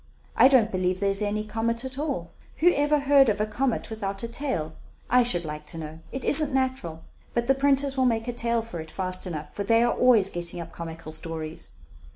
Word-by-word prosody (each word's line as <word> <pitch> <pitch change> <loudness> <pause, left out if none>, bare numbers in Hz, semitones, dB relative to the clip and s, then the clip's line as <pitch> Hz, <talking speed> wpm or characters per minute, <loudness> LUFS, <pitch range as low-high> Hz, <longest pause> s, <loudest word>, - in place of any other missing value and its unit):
I - - +7
don't 245 -5 +4
believe 185 0 -1
there 200 0 +1
is 195 +1 +2
any 210 +1 -1
comet 230 +3 -2
at 260 +1 -6
all. 270 - -3 0.3
Who 350 +2 +4
ever 290 +1 +2
heard 275 -2 +5
of 210 -1 0
a 215 - +1
comet 235 +2 -2
without 200 -2 -4
a - - -2
tail, 230 - -2 0.4
I 250 +1 +6
should 180 -9 0
like 150 0 -7
to - - -5
know? 160 0 -7
It 265 - -5
isn't 295 0 +4
natural; 255 -12 -2 0.3
but 235 0 +1
the 270 - +4
printers 275 0 +2
will 260 - +3
make 225 -1 0
a 245 - -2
tale 235 -1 0
for 200 -7 -7
it 160 0 -8
fast 185 +1 -1
enough, 155 -4 -6
for 200 - -3
they 230 +3 +3
are 240 - +2
always 240 -6 +4
getting 175 0 -1
up 165 -1 -7
comical 165 -1 -8
stories." 160 0 -4
220 Hz, 220 wpm, -26 LUFS, 170-260 Hz, 0.4 s, I